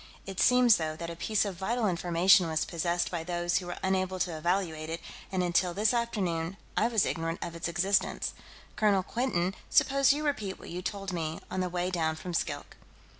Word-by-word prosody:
"It 195 -2 -6
seems, 250 -3 +6
though, 155 -1 -2
that 170 +1 -5
a - - -7
piece 215 +5 +1
of 195 -3 -4
vital 225 +5 0
information 175 +1 +4
was 160 -1 0
possessed 175 +1 -1
by 170 -2 -3
those 175 +1 0
who 180 - -8
were 175 - -5
unable 190 0 0
to 175 -3 -1
evaluate 160 -1 -1
it, 165 +1 -3 0.3
and 185 -1 0
until 175 0 +1
this 210 +3 +2
afternoon, 195 -7 -1 0.2
I 225 - +3
was 225 -4 +2
ignorant 165 0 -2
of 170 - -6
its 170 - -3
existence. 190 +4 0 0.4
Colonel 200 -3 +3
Quinton, 190 -6 -1 0.2
suppose 275 -1 +4
you 300 +2 -1
repeat 215 -10 -2
what - - -10
you 180 +1 -4
told 195 0 -4
me, 160 -2 -3
on - - -2
the 185 -1 0
way 180 +1 -1
down 160 -3 0
from 175 +2 -6
Skilk." 145 -3 -3
180 Hz, 200 wpm, -29 LUFS, 170-200 Hz, 0.4 s, seems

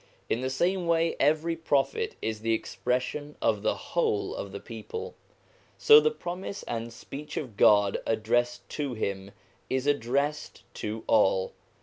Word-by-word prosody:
In 115 - 0
the 130 - -1
same 175 +6 0
way, 165 0 +2
every 155 +4 +2
Prophet 165 - 0
is 110 -1 -2
the 115 +1 +1
expression 130 +6 -3
of - - +1
the - - +1
whole 430 -4 -1
of - - -6
the - - -6
people. 455 +1 -7 0.6
So 445 0 +8
the 460 - +3
promise 190 - -6
and 115 0 -4
speech 140 +6 -8
of 125 -8 -4
God 100 -1 +5
addressed 120 +2 0
to 145 -5 -3
him 100 -2 -3 0.4
is 130 0 0
addressed 145 +2 -1 0.2
to 110 +1 -4
all. 95 -3 +3
140 Hz, 145 wpm, -28 LUFS, 115-175 Hz, 0.6 s, So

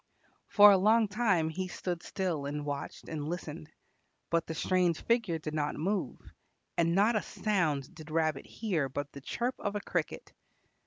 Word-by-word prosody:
For 205 0 +8
a 195 - +5
long 220 +3 +4
time 200 -6 +2
he 185 +3 -3
stood 175 -1 -4
still 170 -7 -2
and 145 +1 -4
watched 140 -1 -5
and 150 -2 -4
listened. 160 -2 -6 0.6
But 170 0 +1
the 160 - -4
strange 180 -1 +1
figure 230 -8 +1
did 155 -1 -6
not 150 -1 -1
move, 195 +6 -1 0.6
and 170 0 +2
not 210 +4 +4
a 215 - +2
sound 160 -10 -1
did 155 -1 -11
Rabbit 155 -3 0
hear 175 -11 -1
but 145 +2 -4
the 140 - -10
chirp 240 - -2
of 205 0 -3
a 205 - -2
cricket. - - -3
170 Hz, 170 wpm, -31 LUFS, 155-205 Hz, 0.6 s, For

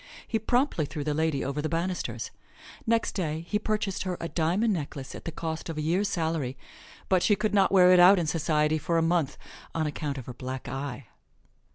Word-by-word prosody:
He 225 - 0
promptly 240 - +1
threw 150 -1 -5
the 150 0 -1
lady 155 -2 0
over 140 +2 -2
the 155 - -2
banisters. 170 +3 -2 0.6
Next 230 0 +2
day 160 -5 -2
he 210 - 0
purchased 210 -3 -1
her 185 -2 -2
a 170 - -4
diamond 180 +7 +1
necklace 140 -5 -5
at - - -9
the 165 - -3
cost 160 0 -4
of 160 - -4
a - - -1
year's 185 +6 +1
salary, 160 -7 -1 0.5
but 185 -2 +3
she 205 - +4
could 210 +1 -1
not 195 -2 +4
wear 180 -2 +7
it 180 - +6
out 185 +3 +8
in 175 - +1
society 155 -1 +1
for 165 +3 0
a 165 - +3
month 165 -4 +1 0.4
on 160 -1 +1
account 145 -1 -3
of 130 - -6
her 125 - -7
black 130 +1 -6
eye. 135 0 -5
165 Hz, 210 wpm, -28 LUFS, 150-185 Hz, 0.6 s, out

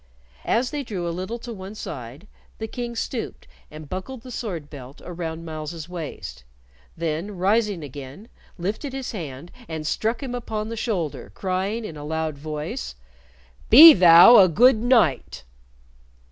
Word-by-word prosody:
As 245 +2 +1
they 295 -1 -3
drew 190 -8 -4
a - - -2
little 185 +7 -5
to 240 0 -8
one 195 0 -9
side, 130 - -8 0.3
the 220 - -4
King 240 +1 -6
stooped 230 +1 -5 0.2
and 155 0 -11
buckled 225 - -6
the 255 - -10
sword 185 -11 -5
belt 135 -1 -11
around 165 -2 -6
Myles's 155 0 -6
waist, 165 - -7 0.5
then, 170 +5 -3
rising 200 -1 +1
again, 140 - -10 0.3
lifted 210 - -4
his 270 -1 -5
hand 160 - -7 0.2
and 160 -1 -5
struck 225 - -1
him 255 -2 -5
upon 220 -3 -4
the 230 - -5
shoulder, 195 - -3
crying, 195 +4 -2
in 160 -6 -8
a 145 - -8
loud 160 0 -3
voice. 150 - -6 0.7
"Be 310 +7 +11
thou 175 +6 +8
a 190 - +8
good 240 - +5
knight!" 225 - +1
185 Hz, 150 wpm, -23 LUFS, 155-225 Hz, 0.7 s, Be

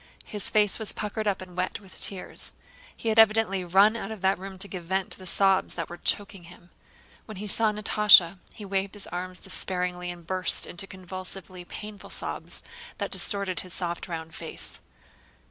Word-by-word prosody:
His 210 -2 -1
face 210 -1 +3
was 220 - -1
puckered 215 +1 -3
up 195 -2 0
and 180 -1 -13
wet 185 0 -1
with 195 -2 -15
tears. 195 -2 +1 0.4
He 230 - -2
had 220 0 +4
evidently 215 -3 +5
run 195 +5 +5
out 220 - -4
of 220 -3 -7
that 190 0 +2
room 190 0 -7
to 195 - +2
give 185 -3 -7
vent 190 +2 -1
to - - -5
the 185 - -9
sobs 195 +1 +3
that 165 -2 -4
were 175 - -7
choking 195 -2 0
him. 175 0 -15 0.5
When 215 -3 -8
he 205 - -4
saw 215 +1 +3
Natásha 205 -4 +6
he 210 - -9
waved 195 +1 -1
his 205 - -6
arms 180 +1 -5
despairingly 180 -1 -2
and 175 -1 -8
burst 185 0 +1
into 185 +3 -7
convulsively 185 -1 -8
painful 210 +2 -8
sobs - - -6 0.3
that - - -3
distorted 200 -4 0
his 185 -1 -8
soft 175 -2 -3
round 160 -2 -6
face. 150 - -7
190 Hz, 185 wpm, -27 LUFS, 180-205 Hz, 0.5 s, Natásha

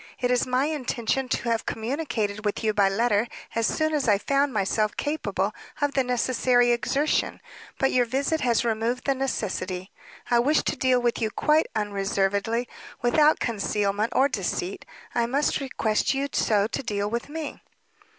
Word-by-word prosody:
It 250 0 +1
was 250 0 +2
my 255 +2 +2
intention 265 -3 -1
to 235 - -1
have 230 -1 -1
communicated 220 -4 -2
with 210 +2 -2
you 215 -1 +2
by 200 -1 +4
letter 220 +2 +1 0.3
as 230 -1 +1
soon 310 0 0
as 290 -4 0
I 205 -2 +5
found 275 +6 +1
myself 215 0 0
capable 300 +2 -1 0.3
of 290 -1 0
the 265 - +2
necessary 245 0 +2
exertion, 275 +6 0 0.4
but 270 - +2
your 250 -1 +3
visit 280 +6 0
has 240 -1 +2
removed 230 +2 -1
the 275 - +3
necessity. 195 -8 -3 0.4
I 240 - +5
wish 290 +6 +3
to - - -1
deal 255 -1 +2
with 240 0 0
you 220 - +1
quite 305 +7 +2
unreservedly, 200 +2 0 0.4
without 300 +5 +4
concealment, 210 -1 0
or 270 - +5
deceit; 195 -6 -3 0.3
I 235 -1 +1
must 280 +5 +1
request 260 -3 0
you 280 +1 -1
so 205 -2 +2
to 225 - -3
deal 205 -5 -2
with 235 +5 -3
me." 310 -1 -6
240 Hz, 165 wpm, -25 LUFS, 215-270 Hz, 0.4 s, I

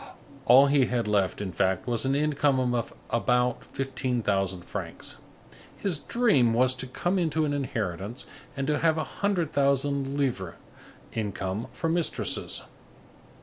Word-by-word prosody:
All 130 +2 +8
he 140 -2 +3
had 120 -3 -1
left, 100 -1 +1
in 95 - -4
fact, 95 +2 0
was 120 0 -1
an 135 +1 +2
income 140 -4 +2
of 120 -2 -1 0.2
about 125 +1 +1
fifteen 130 -3 -2
thousand 95 -3 0
francs. - - -6 0.6
His 180 -7 -1
dream 145 - +3
was 130 +1 +4
to 130 0 -4
come 175 +9 -1
into 160 -2 +1
an 145 - -1
inheritance 110 -5 -3 0.3
and 135 - -1
to 150 +1 +1
have 160 -1 +3
a 155 - 0
hundred 180 -1 -1
thousand 140 0 +1
livres 120 -11 -1 0.6
income 100 -1 -3
for 165 - -3
mistresses. 165 0 0
130 Hz, 145 wpm, -27 LUFS, 115-145 Hz, 0.6 s, All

